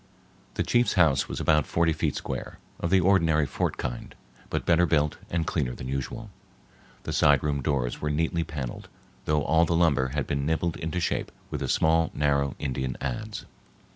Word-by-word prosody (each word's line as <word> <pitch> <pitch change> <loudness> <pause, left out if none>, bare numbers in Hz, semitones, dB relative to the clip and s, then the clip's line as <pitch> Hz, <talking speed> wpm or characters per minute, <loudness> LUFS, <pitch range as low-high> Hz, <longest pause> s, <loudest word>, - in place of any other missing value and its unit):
The - - 0
chief's 120 -3 +2
house 80 -8 +3
was - - -4
about 75 -2 +3
forty 85 -1 +2
feet - - -1
square, - - -5 0.2
of 85 - -1
the 95 +1 +5
ordinary 85 -5 +3
fort - - -2
kind, - - -5 0.3
but - - -2
better 85 +1 +4
built 75 -2 +1
and 85 -2 -1
cleaner 65 -7 -1
than 65 - -7
usual. 70 - -4 0.7
The - - -4
side 75 -3 +4
room 70 -2 0
doors 65 -4 -1
were 75 - -1
neatly 80 +2 0
paneled, 75 -7 -6 0.4
though 75 -1 +1
all 80 +3 +3
the 85 - 0
lumber 75 -6 +3
had 75 - 0
been 70 -1 -2
nibbled 80 +2 0
into 80 +2 -3
shape 85 - -1 0.2
with - - -3
a - - -1
small 80 0 +3
narrow 70 -2 +1
Indian 65 -3 -3
adze. 85 - -4
75 Hz, 180 wpm, -27 LUFS, 70-85 Hz, 0.7 s, the